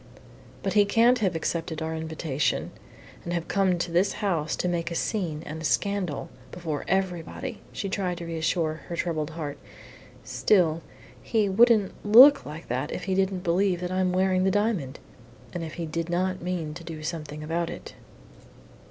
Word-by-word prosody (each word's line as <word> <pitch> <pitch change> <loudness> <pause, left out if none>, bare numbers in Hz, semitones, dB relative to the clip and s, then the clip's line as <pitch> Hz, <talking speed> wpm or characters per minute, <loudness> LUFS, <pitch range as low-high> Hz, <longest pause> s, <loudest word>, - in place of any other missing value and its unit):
"But 195 - -1
he 210 -1 +6
can't 235 +4 +4
have 190 -5 +1
accepted 165 0 -2
our 160 0 -3
invitation, 160 -3 -2 0.5
and 175 - -4
have 170 -1 -2
come 190 -2 +2
to 170 0 -3
this 185 +4 +2
house 170 -7 -1
to - - -1
make 170 -1 -1
a 170 - -4
scene 165 -6 -2
and 160 +1 -6
a - - -7
scandal 185 -1 -1 0.2
before 160 -4 -4
everybody," 190 +5 -2
she 200 - -4
tried 185 -2 -2
to 170 - -6
reassure 160 -1 -1
her 170 - -4
troubled 160 -3 -2
heart. 150 -3 -6 0.6
"Still, 170 -5 +2 0.4
he 220 -3 +1
wouldn't 215 0 +4
look 250 - +8
like 155 +3 -8
that 130 +5 -2
if - - -4
he 190 - -1
didn't 190 -1 +1
believe 180 +1 +2
that 180 0 -3
I'm 185 0 +1
wearing 185 0 +2
the 190 - +3
diamond, 200 - 0 0.6
and 175 - -3
if 160 - -6
he 170 - -3
did 165 +2 -3
not 185 +1 0
mean 170 -3 -3
to 170 +2 -9
do 160 -2 -7
something 155 -2 -5
about 165 +2 -1
it." - - -8
175 Hz, 175 wpm, -26 LUFS, 160-190 Hz, 0.6 s, look